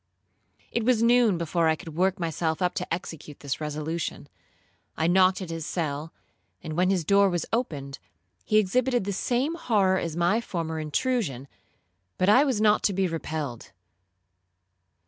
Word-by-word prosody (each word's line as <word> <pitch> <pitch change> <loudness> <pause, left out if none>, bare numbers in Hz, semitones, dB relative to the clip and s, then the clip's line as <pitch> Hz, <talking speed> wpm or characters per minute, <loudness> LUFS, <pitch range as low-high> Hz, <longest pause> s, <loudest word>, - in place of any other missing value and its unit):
'It 235 - -1
was 230 -1 +3
noon 235 -5 +4
before 170 0 0
I 160 - +3
could 155 0 -10
work 190 +3 +1
myself 160 -1 -1
up 180 -1 +1
to - - -5
execute 165 -4 -6
this 140 +1 -4
resolution. 155 +2 -4 0.7
I 160 - +1
knocked 185 +2 +4
at 170 - -7
his 165 -1 -4
cell, 155 -1 -3 0.5
and 155 -2 -5
when 180 +2 +2
the 190 -3 +1
door 200 +4 +4
was 175 -2 -1
opened, 140 - -3 0.4
he 215 - +2
exhibited 245 +4 +2
the 200 +1 -3
same 250 - 0
horror 200 - +2
as 165 - -3
at - - -4
my 180 +7 +2
former 165 -6 -4
intrusion, 155 - -1 0.7
but 185 - +2
I 250 +7 +7
was 265 -7 0
not 215 -1 +4
to 200 - +2
be 190 0 +1
repelled. 155 -7 -5
180 Hz, 165 wpm, -26 LUFS, 160-210 Hz, 0.7 s, I